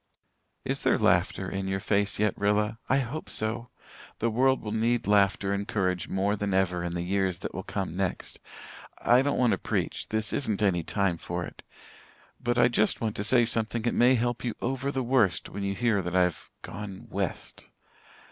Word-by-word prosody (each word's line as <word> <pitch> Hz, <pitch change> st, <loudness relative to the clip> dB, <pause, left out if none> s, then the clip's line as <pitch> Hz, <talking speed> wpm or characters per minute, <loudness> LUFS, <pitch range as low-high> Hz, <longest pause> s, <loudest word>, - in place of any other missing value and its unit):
"Is -, -, -1 dB
there -, -, +3 dB
laughter -, -, +2 dB
in 95 Hz, 0 st, -3 dB
your 95 Hz, 0 st, -1 dB
face 100 Hz, 0 st, 0 dB
yet, 105 Hz, -1 st, +1 dB
Rilla? 105 Hz, +2 st, +1 dB
I 130 Hz, -, +4 dB
hope 135 Hz, +4 st, -3 dB
so. 115 Hz, +2 st, -1 dB, 0.5 s
The 115 Hz, +1 st, 0 dB
world 130 Hz, +4 st, +3 dB
will 105 Hz, -, -4 dB
need 115 Hz, +2 st, +1 dB
laughter 100 Hz, -1 st, +3 dB
and 100 Hz, +1 st, -2 dB
courage 95 Hz, -4 st, -1 dB
more 100 Hz, +2 st, 0 dB
than 100 Hz, -2 st, -1 dB
ever 90 Hz, -2 st, +1 dB
in 85 Hz, 0 st, -3 dB
the 85 Hz, -, -2 dB
years 95 Hz, -1 st, 0 dB
that -, -, -6 dB
will -, -, -4 dB
come -, -, -4 dB
next. -, -, -3 dB, 0.6 s
I 120 Hz, +2 st, +5 dB
don't 145 Hz, +1 st, 0 dB
want 125 Hz, -2 st, +3 dB
to -, -, 0 dB
preach -, -, -2 dB
this 110 Hz, -1 st, -2 dB
isn't 110 Hz, -7 st, -1 dB
any 90 Hz, -4 st, +2 dB
time 95 Hz, 0 st, 0 dB
for 85 Hz, +1 st, -3 dB
it. -, -, -11 dB, 0.8 s
But 120 Hz, 0 st, 0 dB
I 120 Hz, 0 st, +6 dB
just 110 Hz, -3 st, +1 dB
want 110 Hz, -2 st, -2 dB
to 105 Hz, -, -1 dB
say 120 Hz, +2 st, +4 dB
something 115 Hz, 0 st, -1 dB
that 120 Hz, -, +1 dB
may 125 Hz, +2 st, +5 dB
help 120 Hz, 0 st, -1 dB
you 120 Hz, -3 st, -2 dB
over 135 Hz, +2 st, -2 dB
the 135 Hz, -2 st, -1 dB
worst 115 Hz, -8 st, +2 dB
when 100 Hz, -, -6 dB
you 100 Hz, 0 st, -1 dB
hear 115 Hz, -4 st, +1 dB
that 90 Hz, 0 st, -4 dB
I've 90 Hz, -2 st, +1 dB
gone 100 Hz, 0 st, -7 dB
'west.' -, -, -4 dB
105 Hz, 195 wpm, -28 LUFS, 95-120 Hz, 0.8 s, I